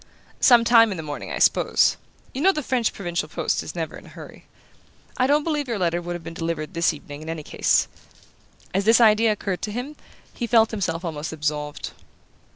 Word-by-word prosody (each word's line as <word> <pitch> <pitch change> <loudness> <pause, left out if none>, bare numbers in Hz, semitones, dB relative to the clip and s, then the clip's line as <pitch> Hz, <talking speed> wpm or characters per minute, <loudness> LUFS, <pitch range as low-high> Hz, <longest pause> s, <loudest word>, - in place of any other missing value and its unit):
"Some 240 -2 +6
time 230 -1 +6
in 190 - -4
the 160 - -5
morning, 145 -1 -6
I - - -3
suppose. - - +3 0.4
You 265 - -4
know 380 +4 +5
the 305 -5 -4
French 245 -3 0
provincial 175 -2 -4
post - - -1
is - - -8
never - - -4
in - - -13
a - - -13
hurry. - - -13 0.7
I 255 - +2
don't 295 +2 +3
believe 295 -3 -2
your 230 -3 -2
letter 175 -2 0
would 175 0 -5
have 175 - -8
been 165 +1 -8
delivered 165 0 -4
this 170 -1 +2
evening 145 0 -10
in 160 - -8
any 165 -2 -5
case." - - +1 0.9
As 195 +1 0
this 225 +2 +6
idea 220 -1 +5
occurred 195 -3 -3
to 210 - -4
him 250 +7 -5 0.4
he 240 - -4
felt 225 -1 +4
himself 180 -5 -3
almost 155 -2 -4
absolved. 150 -1 -3
195 Hz, 205 wpm, -23 LUFS, 165-235 Hz, 0.9 s, Some